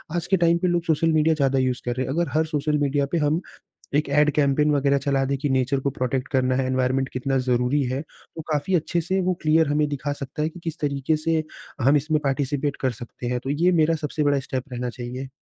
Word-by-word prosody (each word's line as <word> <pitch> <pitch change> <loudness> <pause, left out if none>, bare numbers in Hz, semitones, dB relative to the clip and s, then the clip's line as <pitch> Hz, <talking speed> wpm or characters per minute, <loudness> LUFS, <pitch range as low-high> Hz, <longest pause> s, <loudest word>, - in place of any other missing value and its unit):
आज 175 0 -2
के 190 - +3
टाइम 170 0 +3
पे 180 - 0
लोग 175 -1 +1
सोशल 165 0 +2
मीडिया 155 +1 +3
ज़्यादा 135 -2 +2
यूज़ 130 -1 0
कर 120 0 -1
रहें 130 - -1
हैं। 135 - -2
अगर 170 +2 0
हर 160 +1 +2
सोशल 150 -1 0
मीडिया 140 -1 +1
पे - - +1
हम, 155 +2 +1 0.5
एक 150 0 +2
ऐड 150 +1 +4
कैम्पेन 150 +1 +3
वग़ैरह 140 -1 +2
चला 135 -1 +2
दें 140 +1 0
कि 145 +1 -1
नेचर 130 +1 +1
को 140 - -1
प्रोटेक्ट 130 0 -2
करना 130 -1 +2
है 135 - 0
एनवायरमेंट 130 +1 0
कितना 135 +1 -1
ज़रूरी 125 +4 +2
है, 130 - -2
तो 160 - -14
काफ़ी 165 +6 0
अच्छे 170 +1 +1
से 190 +4 0
वो 185 0 +1
क्लीयर 155 0 +3
हमें 150 0 +1
दिखा 145 0 -3
सकता 140 +2 -5
है 155 - +1
कि 175 +2 -12
किस 165 -1 -4
तरीके 140 +1 0
से 160 +1 0 0.4
हम 140 +4 +5
इसमें 155 +2 +1
पार्टिसिपेंट 140 +1 -1
कर 130 - +1
सकते 120 +1 -8
हैं। 125 0 0
तो 135 - -2
ये 170 +6 +2
मेरा 165 +1 +3
सबसे 150 +1 -1
बड़ा 145 -1 +3
स्टेप 130 -1 -4
रहना 125 - -4
चाहिए। 125 +2 -6
145 Hz, 240 wpm, -24 LUFS, 135-155 Hz, 0.5 s, हम